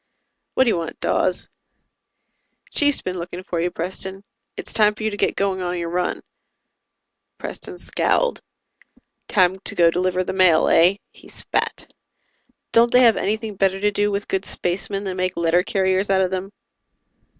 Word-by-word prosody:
"What 260 - +5
do 250 - +1
you - - 0
want, 165 -1 -5
Dawes?" - - 0 1.2
"Chief's 290 -1 +2
been 185 -1 -4
looking 175 +1 -7
for 175 -2 -3
you, 175 - 0
Preston. 190 +3 -4 0.3
It's - - -6
time 210 -1 +4
for 215 - -8
you 220 - 0
to - - -4
get - - 0
going 195 -1 -1
on 180 0 -2
your 170 -1 -3
run." 180 +1 -2 1.1
Preston 385 -3 -6
scowled. - - 0 0.9
"Time 190 -2 +2
to - - -4
go 170 -1 +5
deliver 185 +1 0
the - - -4
mail, 185 -4 +4
eh?" 175 +4 +5 0.2
He - - -17
spat. - - -3 0.8
"Don't 235 +1 +5
they 250 - +6
have 230 -3 +6
anything 215 +1 -2
better 195 0 +1
to 210 +1 +1
do 205 0 +1
with 200 0 -3
good 190 0 -1
spacemen 195 +2 -2
than 190 -2 -4
make 185 0 -1
letter 170 +1 +3
carriers 190 +1 0
out 190 -1 +3
of 185 -1 0
them?" 190 +1 -4
190 Hz, 170 wpm, -21 LUFS, 180-205 Hz, 1.2 s, they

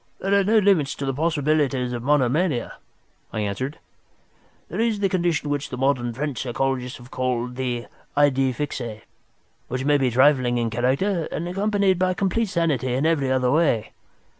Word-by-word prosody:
"There 195 +1 -1
are 200 0 +4
no 215 +3 +3
limits 190 -9 +3
to 140 - -4
the 135 - -1
possibilities 145 -4 0
of 120 - -4
monomania," 145 +2 +1 0.5
I 110 - -2
answered. 105 +8 -3 0.9
"There 185 - -5
is 225 -2 +1
the 195 -1 +1
condition 170 -5 0
which 145 0 -2
the 125 - -5
modern 125 -2 +1
French 135 +1 -3
psychologists 130 0 -2
have 120 +1 -15
called 125 -1 -2
the 125 -2 -2 0.3
idée 135 -2 +3
fixe, 120 -7 -4 0.6
which 130 +2 -3
may 145 0 +3
be 130 -2 +2
trifling 125 -1 +3
in 115 -1 -1
character, 140 - 0
and 170 - -3
accompanied 195 0 +1
by 185 0 +1
complete 200 +3 0
sanity 145 -8 0
in 135 +4 0
every 145 -5 +1
other 130 -1 +2
way. 145 -8 +1
140 Hz, 165 wpm, -23 LUFS, 125-170 Hz, 0.9 s, are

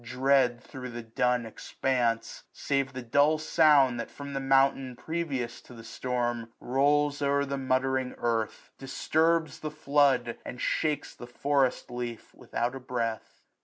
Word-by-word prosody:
Dread 130 0 +2
thro* 130 -2 -8
the 120 0 -7
dun 120 +1 0
expanse; 115 0 -2
save 140 -1 -1
the 130 0 -6
dull 145 +6 +3
sound 145 -5 +4
That 115 - -4
from 140 0 -8
the 135 - -1
mountain, 135 -1 +2
previous 140 -7 -3
to 125 - -14
the 115 - -11
storm. 120 -1 -3
Rolls 145 +3 +2
o'er 140 0 +2
the 140 0 -3
muttering 130 0 0
earth, 115 -2 -2
disturbs 160 +4 +1
the 155 - -4
flood. 140 -5 +2
And 125 - -7
shakes 150 +3 -1
the 120 - -10
forest 135 0 0
leaf 120 -2 -6
without 120 +2 -3
a 135 - -6
breath. 120 -3 -4
130 Hz, 145 wpm, -28 LUFS, 120-140 Hz, -, sound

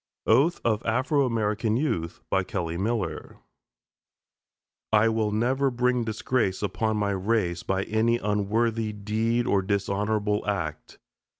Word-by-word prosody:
OATH 140 +10 +3
OF 110 -2 +2
AFRO 130 +4 +1
AMERICAN 110 -1 0
YOUTH 85 - -2 0.3
KELLY 85 -5 -3
MILLER 95 -4 -3 1.5
I 110 +1 +5
will 110 -1 0
never 130 +6 +1
bring 125 0 +1
disgrace 110 -2 -1
upon 105 +3 -1
my 100 -1 0
race 95 -3 0
by 95 0 -1
any 115 +3 +1
unworthy 110 +1 0
deed 110 +3 0
or 100 -5 +2
dishonorable 105 +1 0
act. 80 -7 -3
110 Hz, 115 wpm, -26 LUFS, 100-115 Hz, 1.5 s, I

